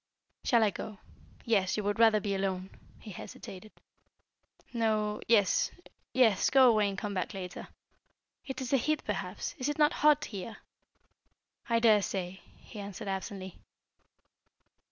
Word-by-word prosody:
"Shall 235 -3 +4
I 210 - +3
go. 215 +1 -7 0.5
Yes, 200 -5 +2
you 210 - -1
would 205 +1 -1
rather 220 -2 +6
be 205 -1 -2
alone 190 -1 -2 0.2
" - - -24
he 215 - -8
hesitated. 190 +2 -10 1.0
"No 215 -2 0
yes 205 -5 +4 0.4
yes, 225 -7 +4
go 265 -1 +6
away 215 -3 +4
and 195 - -5
come 205 0 -3
back 185 0 -3
later. 180 -2 -7 0.8
It 265 -2 -6
is 255 - -4
the 275 - +5
heat 305 +5 0
perhaps; - - -4
is 260 +3 -1
it 295 - -2
not 300 -1 +4
hot 300 0 +5
here?" 205 +1 -7 1.1
"I 230 - +3
daresay," 200 -5 +2 0.2
he 215 - -11
answered 200 +1 -7
absently. 190 -1 -5
210 Hz, 145 wpm, -30 LUFS, 195-230 Hz, 1.1 s, rather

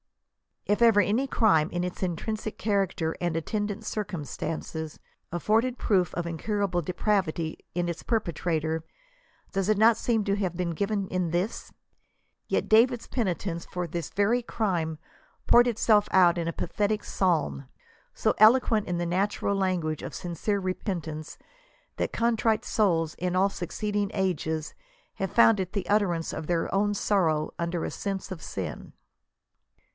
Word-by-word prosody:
If 205 +3 +1
ever 225 -3 +6
any 230 +7 +1
crime, 190 -11 +3
in 175 +1 -2
its 180 0 -5
intrinsic 215 +5 -3
character 195 -6 0
and 175 -2 0
attendant 205 +5 -2
cir> 210 0 -2
cumstances, 160 -1 -5 0.3
afibrded 225 +8 +1
proof 185 -5 +1
of 175 - -2
incurable 180 +2 -1
depravity 175 -2 -1 0.2
in 175 0 0
its 170 - -4
perpe 220 -8 -1
trator, 160 0 -1 0.7
does 195 +1 -1
it 215 - +3
not 225 +1 +5
seem 225 -3 +1
to 200 -1 +1
have 185 -4 -2
been 175 -1 -1
given 200 +3 -1
in 180 -2 -1
this? 175 +6 -2 0.8
Yet - - -1
David's. 235 +2 +4
penitence 185 -6 -2
for 180 0 -4
this 170 -1 -4
very 220 +5 +2
crime 175 -9 -1 0.5
poured 240 +1 +6
itself 215 -2 +3
out 180 -2 +5
in 170 -1 -2
a 165 - -1
pathetic 210 +4 -1
psalm, 115 - 0 0.5
so - - +1
eloquent 220 -1 +5
in 175 - -1
the 175 - -1
natural 195 +3 0
language 180 -5 -1
of - - -6
sincere 180 +4 -2
repentance, 175 -5 -4 0.6
that - - -2
contrite 230 -1 +1
souls 165 -7 +1
in 180 0 -2
all 190 +2 +4
succeeding 205 +3 -2
ages 160 -5 -1 0.4
have 195 - -3
found 225 -3 +5
it 185 0 -3
the 195 -4 -2
utterance 185 -6 +1
of 155 - -5
their 170 -2 0
own 205 +1 +2
sorrow 165 -7 +1
under 170 0 -1
a - - -3
sense 195 -1 -4
of 175 -4 -6
sin. - - -6
190 Hz, 150 wpm, -27 LUFS, 170-210 Hz, 0.8 s, ever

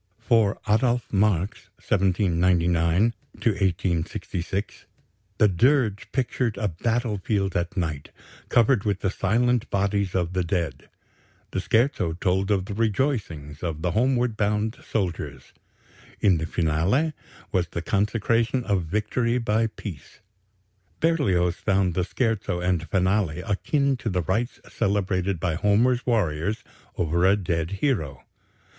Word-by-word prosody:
For 115 -3 +2
Adolph 120 +3 +1
Marx 100 -2 +1
(1799 90 0 +2 0.2
1866) 95 -1 -2 0.5
the 105 - +5
dirge 110 - +2
pictured 125 -4 -1
a 105 - 0
battle 110 +4 -1
field 95 -1 -1
at 85 +1 -2
night, 75 -5 -2 0.4
covered 120 -2 +3
with 100 -3 -1
the 95 - 0
silent 120 +5 +1
bodies 100 -1 0
of 90 -1 0
the 95 -1 0
dead; 85 -6 -3 0.6
the - - -1
scherzo 115 - +1
told 95 +3 0
of 95 -3 +1
the 100 - -5
rejoicings 100 - -1
of 80 -3 -4
the 90 - +1
homeward 120 +2 +1
bound 105 +1 0
soldiers; 80 - -4 0.7
in 95 -5 +3
the 80 - -3
finale 90 - +1 0.4
was 90 -2 +1
the 85 - -5
consecration 115 +4 +1
of 100 -5 +1
victory 115 +6 0
by 115 -1 +1
Peace. 95 - -9 0.8
Berlioz 95 - +2
found 95 -3 +1
the 90 - 0
scherzo 110 -3 -1
and 90 -2 -1
finale 95 -3 +1
akin 135 +8 0
to 120 - -3
the 90 -3 -1
rites 110 +9 -1
celebrated 95 -2 0
by 85 0 0
Homer's 115 +8 +2
warriors 100 -2 0 0.3
over 85 +1 +1
a 95 +2 +5
dead 85 -4 -2
hero. 75 - -1
100 Hz, 125 wpm, -25 LUFS, 85-115 Hz, 0.8 s, the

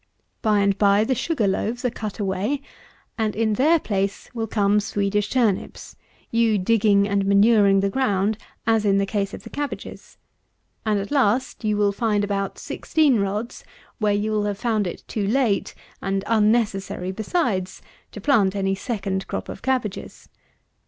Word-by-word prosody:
By 210 -2 +3
and 200 -1 +2
by 200 0 +4
the 260 - +1
Sugar 255 -4 0
loaves 225 +6 -2
are 250 - +1
cut 215 -3 -6
away, 205 +8 -2 0.6
and 215 -1 0
in 220 0 +1
their 300 +10 +4
place 195 -8 -3
will 225 -2 -3
come 205 -1 +2
Swedish 205 0 -1
turnips, 230 -7 -1 0.4
you 230 -2 +3
digging 200 0 +3
and 200 -1 +1
manuring 200 -1 +5
the 200 - +1
ground 210 -3 0 0.3
as 225 -2 +2
in 200 -2 +3
the 200 - +2
case 200 -1 -2
of - - -9
the - - -11
cabbages: 290 -1 -6 0.7
and, 210 -1 +2
at 200 +5 -5
last, 255 -2 +1
you 210 -1 +1
will 205 -1 +3
find 210 -1 0
about 200 -1 -2
16 295 -8 +1
rods 205 +4 -3 0.4
where 210 -2 +2
you 205 +1 0
will 210 -1 0
have 205 -1 -2
found 220 -3 0
it 175 - -7
too 205 -3 -2
late, 230 -3 +1 0.3
and 195 0 -1
unnecessary 210 -4 +1
besides, 205 - -2 0.3
to - - -8
plant 205 -9 +2
any 195 -1 0
second 195 -2 -3
crop - - -5
of - - -7
cabbages. 250 -6 -3
210 Hz, 165 wpm, -23 LUFS, 200-230 Hz, 0.7 s, manuring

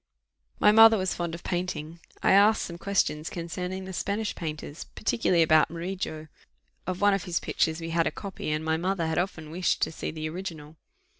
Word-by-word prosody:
My 210 - +6
mother 225 +1 +8
was 185 -1 0
fond 170 -1 -3
of 170 - -11
painting: 170 -2 -3 0.2
I - - +4
asked 205 +3 +5
some 170 -1 -7
questions 160 -6 0
concerning 180 +2 -5
the 190 - -7
Spanish 205 +4 -2
painters, 155 -2 -6
particularly 185 -6 +1
about 155 -1 +4
Murillo; 170 -2 -5 0.6
of 185 0 -3
one 205 0 +5
of 195 - -1
his 175 -2 -1
pictures 160 0 0
we 165 0 -5
had 165 0 +2
a - - 0
copy, 195 -6 -6
and 155 +1 -1
my 160 0 +1
mother 180 0 -1
had 160 +1 0
often 160 -4 -4
wished 180 +1 0
to - - 0
see - - -5
the 155 0 -4
original. 160 -3 -7
170 Hz, 195 wpm, -27 LUFS, 160-190 Hz, 0.6 s, mother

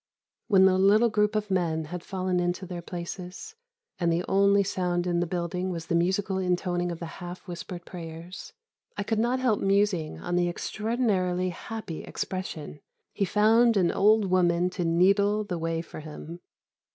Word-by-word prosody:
_" - - -68 0.4
When 195 -4 +6
the 185 -1 +4
little 210 +5 +5
group 210 0 +2
of 210 -1 -1
men 165 -4 0
had 175 +3 -6
fallen 185 -2 -1
into 175 +2 -1
their 175 -1 -6
places, 180 - -7 0.5
and 170 -2 +2
the 170 +2 0
only 200 +1 +4
sound 180 -2 -1
in 175 -1 +1
the 175 - 0
building 180 +1 -2
was 165 -3 -4
the 165 - -2
musical 190 +3 +1
intoning 180 -1 0
of 170 - -5
the 170 - -6 0.2
half 175 +1 -8
whispered 175 0 -7
prayers, 170 +1 -8 0.5
I 200 - -1
could 220 +1 -1
not 245 +3 +1
help 245 -5 +2
musing 195 - +1
on 175 - -3
the 175 0 +2
extraordinarily 190 -3 -1
happy 215 -1 -6
expression, 160 -6 -5 0.3
"he 200 - 0
found 220 +4 +4
an 180 -3 +3
old 210 +1 +4
woman 180 -1 +2
to 180 - -3
needle 200 +5 +3
the 180 -5 -4
way 165 0 -2
for - - -10
him." 155 +2 -9
180 Hz, 175 wpm, -27 LUFS, 175-200 Hz, 0.5 s, When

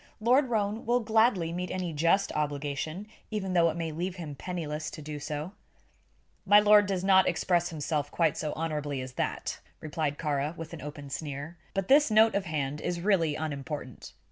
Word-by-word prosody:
"Lord 250 +4 +3
Roane 215 0 -1
will 245 +1 +3
gladly 220 -6 +2
meet 180 +1 -3
any 180 -3 -3
just 170 +6 +2
obligation, 150 +4 -3 0.2
even 195 -4 -3
though 170 -2 +4
it 160 - -4
may 165 -1 -2
leave 175 +4 -3
him 165 -5 -6
penniless 155 -1 -4
to - - -9
do 150 0 -6
so." 150 +4 -4 0.9
"My 205 +1 +7
lord 210 -1 +6
does 190 -2 -1
not 190 -1 +5
express 175 0 +1
himself 150 -2 -2
quite 165 -2 +1
so 155 - -3
honorably 150 -3 -3
as 130 0 -7
that," - - -3 0.2
replied 155 -2 -2
Kāra, 150 +1 -1
with 165 0 -7
an 165 - -7
open 145 -1 -8
sneer. 145 +2 -5 0.2
"But 195 -1 -1
this 290 +1 +6
note 220 +1 +5
of 200 -1 0
hand 150 -3 -2
is 175 -1 -2
really 170 -5 +2
unimportant. 145 -4 -5
165 Hz, 180 wpm, -29 LUFS, 150-195 Hz, 0.9 s, My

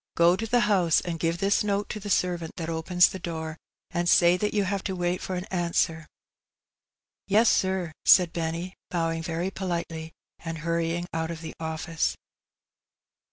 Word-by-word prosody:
Gro 170 +1 +5
to 225 - -3
the 245 +2 +3
house, 185 -7 +3
and 170 -2 -4
give 165 +1 0
this 200 +3 +2
note 205 -1 0
to 215 - -4
the 205 0 -7
servant 175 -4 0
that 165 -1 -4
opens 175 +2 +3
the 190 - -7
door, 160 -2 -5 0.4
and 175 0 0
say 175 +1 +6
that 210 +3 -1
you 205 -1 +1
have 195 0 -2
to 190 - -2
wait 175 0 -1
for 185 - -4
an 180 +1 -4
answer.'' 170 -3 0 0.7
" - - -66 0.3
Yes, 215 +3 +5
sir," 190 -3 0
said 180 -3 +6
Benny, 170 +2 -3 0.2
bowing 165 -2 -1
very 165 +3 -2
politely, 170 -4 -4 0.3
and 165 -1 -5
hurry 165 +1 -1
ing 175 0 -3
out 160 0 -2
of 165 -1 -6
the 160 - -7
office. 160 +1 -2
175 Hz, 180 wpm, -26 LUFS, 165-190 Hz, 0.7 s, say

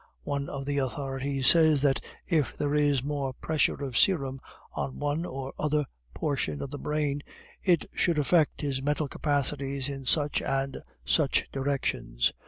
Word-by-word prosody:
One 140 -1 -2
of 135 -1 -5
the 140 0 0
authorities 135 +1 -2
says 155 -1 +6
that 135 -2 +2 0.2
if 155 -6 +1
there 145 0 0
is 145 -3 +3
more 140 -2 -2
pressure 150 0 0
of 130 -3 -4
serum 135 -7 +3 0.3
on 135 - -3
one 145 +3 -1
or 135 0 -6
other 150 -1 +1 0.3
portion 135 - -1
of 135 - -6
the 145 - -5
brain, 150 -1 -1 0.4
it 175 -4 +3
should 170 -2 +1
affect 150 +1 +2
his 140 -3 -1
mental 145 +2 0
capacities 140 -1 -1
in 135 -1 -6
such 145 +2 +3
and 135 0 -2 0.2
such - - +2
directions. 135 - 0
140 Hz, 155 wpm, -28 LUFS, 135-150 Hz, 0.4 s, says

